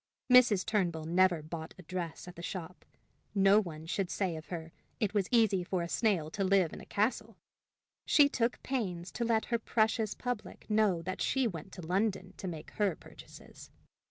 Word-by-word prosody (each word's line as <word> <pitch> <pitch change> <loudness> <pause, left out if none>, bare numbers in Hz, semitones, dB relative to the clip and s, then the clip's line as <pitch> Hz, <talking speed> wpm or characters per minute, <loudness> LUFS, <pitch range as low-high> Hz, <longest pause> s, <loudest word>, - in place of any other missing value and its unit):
Mrs. 235 -7 +6
Turnbull 175 -7 0
never 175 0 +3
bought 160 +1 -7
a 185 - -12
dress 170 -1 -5
at 180 - -9
the 170 - -9
shop. 175 -2 -6 0.5
No 195 +1 +6
one 160 -6 -6
should 185 +2 -2
say 185 -4 -1
of 160 +1 -8
her, 165 -2 -6 0.3
it 210 -2 0
was 200 -3 +1
easy 215 -6 +3
for 175 0 -1
a - - -3
snail 175 -6 +1
to 195 - -2
live 190 -3 +3
in - - -8
a - - -13
castle! 220 0 -1 0.7
She 290 -2 +6
took 240 -4 -1
pains 185 -9 -3
to 235 - -3
let 225 -1 +1
her 235 - +3
precious 220 -1 +1
public 245 -4 -5
know 210 -6 +3
that 185 +2 -4
she 265 -1 +1
went 185 -4 -4
to 180 - -8
London 195 +4 -1
to 190 - -5
make 160 -4 -7
her 200 -5 0
purchases. - - -14
190 Hz, 185 wpm, -32 LUFS, 170-220 Hz, 0.7 s, Mrs